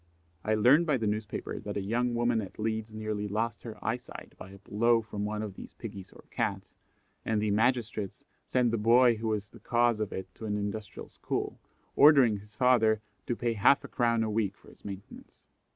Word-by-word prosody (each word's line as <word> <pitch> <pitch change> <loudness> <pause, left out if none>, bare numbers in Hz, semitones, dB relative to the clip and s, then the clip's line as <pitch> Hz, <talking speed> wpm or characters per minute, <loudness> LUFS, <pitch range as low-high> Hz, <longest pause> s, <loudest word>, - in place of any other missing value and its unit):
I 110 0 +1
learn 125 +10 +6
by 150 -4 +2
the 115 - -2
newspaper 105 0 -3
that 105 -1 -5
a 100 - -2
young 120 +4 0
woman 120 -1 +2
at 95 - -9
Leeds 110 0 -2
nearly 110 -1 -3
lost 110 +2 -2
her 115 -2 -8
eye 115 +2 +1
sight 125 - -12
by 95 - -11
a 100 - -12
blow 115 +3 +2
from 105 -2 -4
one 105 0 -3
of 105 -2 -5
these - - -11
piggies 95 -1 -8
or - - -16
cats, - - -2 0.5
and 110 -1 0
the 105 0 0
magistrates 110 -2 0 0.2
sent 125 -2 +2
the 115 - 0
boy 120 +2 +5
who 110 +1 -3
was 105 -2 -2
the 115 - -15
cause 120 0 +2
of 105 -2 -2
it 95 -1 -6
to 110 - -7
an 105 0 -1
industrial 105 0 -5
school, - - -4 0.4
ordering 135 -7 +7
his 105 +1 -18
father 115 -3 +4 0.3
to 120 - 0
pay 120 0 -1
half 115 +6 +4
a - - -7
crown 115 -2 +1
a 110 - -1
week 105 -2 -1
for - - -18
his - - -20
maintenance. 100 -1 -10
110 Hz, 210 wpm, -29 LUFS, 105-120 Hz, 0.5 s, ordering